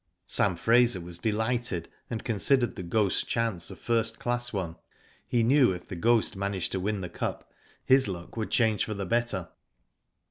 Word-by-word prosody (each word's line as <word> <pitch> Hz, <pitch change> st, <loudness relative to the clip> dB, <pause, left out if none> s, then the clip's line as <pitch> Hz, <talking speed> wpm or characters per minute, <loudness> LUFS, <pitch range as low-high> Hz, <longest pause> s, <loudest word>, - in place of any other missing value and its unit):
Sam 90 Hz, -1 st, +1 dB
Fraser 115 Hz, +2 st, +4 dB
was 85 Hz, 0 st, -7 dB
delighted, 110 Hz, -3 st, -1 dB, 0.2 s
and 115 Hz, -2 st, -4 dB
considered 120 Hz, 0 st, +1 dB
The -, -, -5 dB
Ghost's 95 Hz, +3 st, +1 dB
chance 115 Hz, -7 st, -1 dB
a -, -, -8 dB
first 115 Hz, -1 st, 0 dB
class 120 Hz, 0 st, -1 dB
one. 90 Hz, -5 st, -3 dB, 0.5 s
He 120 Hz, -1 st, +2 dB
knew 125 Hz, -3 st, +5 dB
if 90 Hz, -1 st, -8 dB
The 95 Hz, -, -7 dB
Ghost 115 Hz, +5 st, +2 dB
managed 100 Hz, -2 st, -2 dB
to 95 Hz, -, -1 dB
win 100 Hz, +1 st, -1 dB
the 90 Hz, -, -4 dB
Cup -, -, -3 dB, 0.3 s
his 130 Hz, -2 st, +5 dB
luck 85 Hz, -3 st, -6 dB
would 110 Hz, -2 st, -3 dB
change 110 Hz, -4 st, +2 dB
for 110 Hz, -, -4 dB
the 100 Hz, -1 st, -3 dB
better. 110 Hz, -4 st, -1 dB
110 Hz, 175 wpm, -28 LUFS, 95-120 Hz, 0.5 s, knew